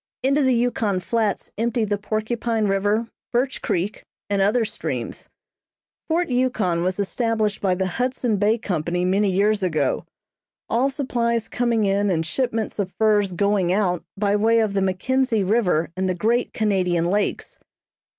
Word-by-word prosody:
Into 275 +3 +3
the 260 -2 +3
Yukon 230 -5 0
Flats 215 +2 -1
empty 235 0 +1
the 205 -1 -1
Porcupine 220 +1 -1
River, 205 +3 0 0.2
Birch 255 +3 0
Creek 185 +4 -2 0.3
and 200 -1 +2
other 220 +4 +2
streams. 220 +1 -5 0.8
Fort 340 +1 0
Yukon 235 -9 +1
was 185 +2 -1
established 215 0 0
by 185 -2 +2
the 190 +1 -1
Hudson 245 +2 -1
Bay 210 +3 +2
Company 180 -3 -2
many 195 +2 +2
years 205 +2 +2
ago, 155 -7 0 0.6
all 245 +4 +2
supplies 235 -5 -1
coming 235 -3 0
in 200 +1 +1
and 165 -3 0
shipments 225 +4 -2
of 190 -2 -1
furs 210 -3 +2
going 200 -1 +1
out 185 -3 +1
by 200 0 +1
way 225 +2 +3
of 220 -3 +1
the 195 - +1
McKensie 220 +3 +1
River 180 -7 +1
and 185 0 -1
the 185 - 0
great 230 +6 +1
Canadian 185 -6 +1
Lakes. 205 - -1
210 Hz, 150 wpm, -22 LUFS, 190-235 Hz, 0.8 s, Into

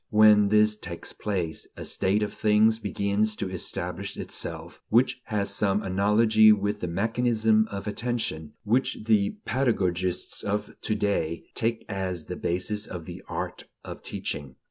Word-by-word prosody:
When 105 -1 +6
this 105 0 +4
takes 85 -5 -8
place, 90 -6 -3
a - - -6
state 100 +3 +1
of 105 - -3
things 110 +1 +3
begins 100 +1 0
to - - -3
establish 90 - -4
itself - - -5
which 125 +2 +3
has 100 -2 -1
some 100 0 +1
analogy 105 +3 +5
with 105 0 +1
that 90 - -3
mechanism 110 +2 +2
of 100 -1 -5
attention 105 -9 -3
which 120 +5 +1
the 110 - +2
pedagogists 95 -9 0
of 105 0 -2
to 110 - 0
day 85 -6 -1
take 115 -1 -1
as 95 -4 -3
the - - -5
basis 105 +4 -2
of 85 -3 -7
the - - -8
art - - -4 0.2
of - - -8
teaching. 70 -3 -5
105 Hz, 145 wpm, -27 LUFS, 95-110 Hz, 0.2 s, When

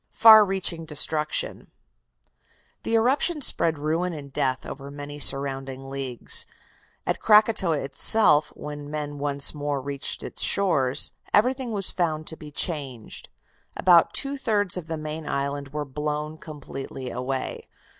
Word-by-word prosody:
FAR 220 -1 +7
REACHING 190 -4 -1
DESTRUCTION 150 0 -1 1.1
The 230 - -2
eruption 275 +7 +1
spread 165 -8 +2
ruin 165 +4 -2
and 140 -3 -10
death 130 -1 -1
over 140 0 -8
many 145 +1 -9
surrounding 135 -1 +1
leagues. 135 -3 +5 0.6
At - - -2
Krakotoa 210 -6 +3
itself, 150 +3 +2
when 145 -1 -8
men 145 -1 -5
once 140 -1 +2
more 145 -2 -3
reached 140 +1 -3
its - - -4
shores, 140 -10 +3 0.2
everything 255 +3 +1
was 200 -3 +1
found 155 -3 -2
to 160 - -4
be 155 -1 -12
changed. 140 - -3 0.5
About 175 -3 +4
two 275 0 -1
thirds 205 -7 0
of 180 -3 -6
the 165 -1 -4
main 155 0 -7
island 140 0 -3
were 150 +1 -5
blown 150 +2 -4
completely 135 -3 -8
away. 130 +1 -5
150 Hz, 135 wpm, -24 LUFS, 140-180 Hz, 1.1 s, FAR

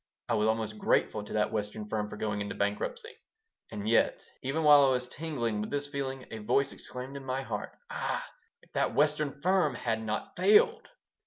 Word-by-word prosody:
I - - +2
was 110 -1 +2
almost 110 -1 -1
grateful 105 0 +2
to 105 - -8
that 105 0 +1
Western 105 0 -3
firm 105 -1 -2
for - - -8
going 105 -1 -2
into 100 - -4
bankruptcy 105 - -3 0.5
And 105 0 -4
yet, 115 - +2 0.2
even 145 +5 -1
while 145 -1 +8
I - - +4
was 125 -1 0
tingling 120 -9 -2
with 105 - -4
this 145 0 0
feeling, 135 -2 -4
a 110 - -5
voice 135 +6 +1
exclaimed 130 +2 -8
in 140 - -6
my 130 0 -2
heart, 110 -4 -5
"Ah, - - -2 0.4
if - - -24
that - - 0
Western 150 -1 +2
firm 180 -7 +3
had 115 -2 -1
not 110 -1 -3
failed!" 210 - +4
125 Hz, 190 wpm, -30 LUFS, 105-145 Hz, 0.5 s, while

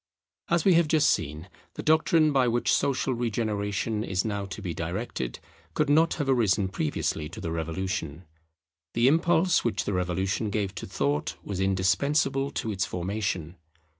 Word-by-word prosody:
As 170 -2 +2
we 190 - +6
have 170 -1 +4
just 155 -1 +4
seen, 80 +2 -2 0.3
the - - -5
doctrine 155 0 +4
by 135 -3 +3
which 120 +1 +1
social 135 -1 +1
regeneration 110 -2 -1
is 95 -2 -1
now 100 -2 -2
to 95 - -7
be 90 -5 -4
directed 80 - -4 0.4
could 150 -1 +2
not 160 +3 +4
have 145 -3 -2
arisen 105 -7 +2
previously 75 -3 -2
to 90 - -9
the 85 -3 -4
Revolution. 85 0 -3 0.7
The 120 +2 +4
impulse 165 +3 +3
which 120 - -1
the 100 - -1
Revolution 95 +4 -1
gave 100 -2 -2
to 90 - -7
thought 70 +1 -1
was 100 -2 -4
indispensable 135 +9 +1
to 110 -5 -3
its 95 -1 -1
formation. 90 -3 -3
105 Hz, 160 wpm, -27 LUFS, 90-135 Hz, 0.7 s, we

